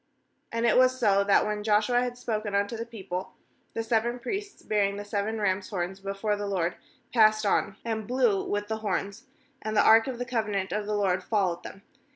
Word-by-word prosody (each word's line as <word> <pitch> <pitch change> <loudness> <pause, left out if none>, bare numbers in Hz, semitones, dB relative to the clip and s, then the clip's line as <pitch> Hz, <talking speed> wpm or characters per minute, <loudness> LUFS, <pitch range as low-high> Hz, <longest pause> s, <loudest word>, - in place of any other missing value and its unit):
8And 230 +1 +1
it 235 - +4
was 255 0 +4
so, 200 -4 +4
that 200 - +4
when 210 0 -2
Joshua 215 +3 +3
had 245 0 -3
spoken 215 -4 -3
unto 200 +3 0
the 230 +1 -5
people, 190 -5 -6 0.4
the 225 - -1
seveS 235 +2 0
priests 395 - -5
bearing 200 -1 +1
the 205 - -6
seven 205 +2 -2
rams* 190 -1 0
horns 190 0 -3
before 195 +2 -2
the 205 0 -4
LORD 180 -3 -1 0.4
passed 215 -2 +5
on, 200 0 +1
and 220 -2 -3
blew 240 -5 +2
with 205 0 -2
the 220 0 -2
horns; 200 -2 -3 0.4
and 215 0 -2
the - - +5
ark 225 +2 +7
of 260 -2 -4
the 245 - -3
covenant 215 -5 -1
of 210 0 -2
the 210 - 0
LORD 190 -3 +1
followed 185 -5 0
them. 195 - -10
210 Hz, 200 wpm, -27 LUFS, 200-230 Hz, 0.4 s, ark